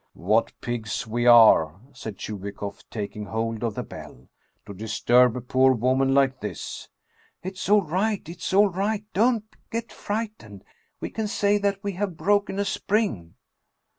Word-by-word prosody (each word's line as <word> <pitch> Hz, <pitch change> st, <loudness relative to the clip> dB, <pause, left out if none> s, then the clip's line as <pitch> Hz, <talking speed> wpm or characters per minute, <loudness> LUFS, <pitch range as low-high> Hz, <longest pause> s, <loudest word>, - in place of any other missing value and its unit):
"What 105 Hz, +6 st, +1 dB
pigs 110 Hz, -6 st, -3 dB
we 120 Hz, +2 st, -1 dB
are," 110 Hz, -9 st, +7 dB
said 110 Hz, -6 st, -8 dB
Chubikoff, 100 Hz, -1 st, -6 dB
taking 105 Hz, -1 st, -5 dB
hold 115 Hz, +1 st, -3 dB
of 115 Hz, -3 st, -2 dB
the -, -, -3 dB
bell, 65 Hz, -, -12 dB, 0.2 s
" -, -, -45 dB
to 100 Hz, -, -8 dB
disturb 115 Hz, +4 st, +3 dB
a -, -, -4 dB
poor 130 Hz, +2 st, +3 dB
woman 130 Hz, +3 st, +2 dB
like 135 Hz, -2 st, +3 dB
this! 105 Hz, -, -6 dB, 0.2 s
" -, -, -36 dB
" -, -, -39 dB
It's 190 Hz, +1 st, -5 dB
all 210 Hz, -1 st, +5 dB
right! 190 Hz, +4 st, -1 dB
It's 170 Hz, +1 st, -5 dB
all 200 Hz, +2 st, +5 dB
right! 200 Hz, +3 st, -1 dB
Don't 225 Hz, +1 st, +2 dB, 0.2 s
get 230 Hz, 0 st, -4 dB
frightened! 205 Hz, -, -5 dB, 0.4 s
We -, -, -4 dB
can 220 Hz, -1 st, -2 dB
say 205 Hz, 0 st, +1 dB
that 200 Hz, -1 st, -1 dB
we 200 Hz, -, -1 dB
have 190 Hz, -2 st, -3 dB
broken 200 Hz, +3 st, +1 dB
a 200 Hz, -, 0 dB
spring." 195 Hz, -, -1 dB
135 Hz, 165 wpm, -25 LUFS, -, 0.4 s, are